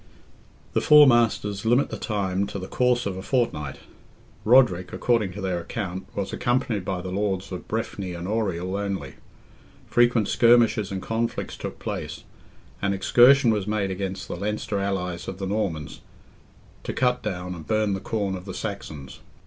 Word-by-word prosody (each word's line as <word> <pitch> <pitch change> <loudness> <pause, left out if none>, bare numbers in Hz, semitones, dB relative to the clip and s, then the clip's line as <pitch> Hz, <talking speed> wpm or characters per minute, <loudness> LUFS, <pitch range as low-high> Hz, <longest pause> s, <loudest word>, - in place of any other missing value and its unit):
The - - +2
Four 150 -1 +8
Masters 110 -5 +2
limit 120 +5 +2
the - - -4
time 100 -3 -1
to 100 - -6
"the 95 - -5
course 125 -1 +1
of 95 -2 -3
a - - -5
fortnight." 95 - -1 0.6
Roderick, 110 -7 +4
according 105 0 +1
to 105 - -7
their 95 -2 -1
account, 95 0 -5
was 100 -1 -3
accompanied 120 -5 0
by 95 -1 -3
the 90 0 -6
lords 95 -1 -2
of 90 - -6
Breffni 100 -5 -3
and 85 +1 -5
Oriel 95 -4 -1
only; 100 -1 -4 0.7
frequent 120 -3 +3
skirmishes 115 -3 +4
and 95 -1 -4
conflicts 115 +1 -2
took - - -6
place; - - -5 0.6
an 95 0 +1
excursion 120 +5 +5
was 105 -2 -1
made 105 -2 0
against 95 0 -4
the - - -4
Leinster 105 +1 -2
Allies 90 -3 -3
of 95 - -5
the 95 - -4
Normans, 95 -8 -3 0.8
"to - - -4
cut 125 -1 +1
down 90 -3 -4
and 80 -3 -10
burn 110 -2 +1
the 95 - -2
corn 100 -2 -2
of 90 0 -8
the 95 - -6
Saxons." 75 - -6
100 Hz, 165 wpm, -25 LUFS, 95-115 Hz, 0.8 s, Four